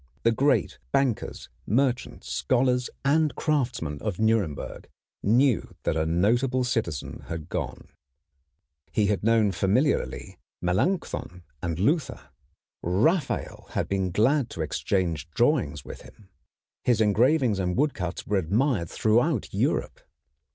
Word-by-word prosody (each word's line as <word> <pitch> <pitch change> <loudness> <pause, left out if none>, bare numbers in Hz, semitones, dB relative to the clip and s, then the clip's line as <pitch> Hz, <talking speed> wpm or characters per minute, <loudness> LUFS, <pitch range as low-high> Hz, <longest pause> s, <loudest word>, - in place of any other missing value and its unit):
The 115 - +4
great 140 +6 +1
bankers, 135 -5 0 0.2
merchants, 125 +3 0
scholars, 125 - +1 0.2
and 155 +2 +3
craftsmen 120 - -1
of 105 -5 -2
Nuremberg 110 -9 -1 0.3
knew 120 +3 +2
that - - 0
a 80 0 0
notable 120 +10 +2
citizen 110 - -3
had 80 -2 -6
gone. - - -4 1.0
He 105 - +2
had 100 -1 0
known 110 -2 +3
familiarly 105 - 0 0.2
Melanchthon 90 - -1 0.2
and 85 -2 -2
Luther. 145 - 0 0.5
Raphael 130 - 0
had - - -1
been 95 -1 0
glad 120 - +2
to 85 - -6
exchange 85 -1 -1
drawings 115 - +1
with - - -9
him. 100 -3 -17 0.5
His 120 -3 +2
engravings 115 +2 +3
and 90 -1 -1
woodcuts 105 - -1
were 105 - +1
admired 100 - +1
throughout 120 - +1
Europe. - - -1
110 Hz, 115 wpm, -26 LUFS, 90-130 Hz, 1.0 s, The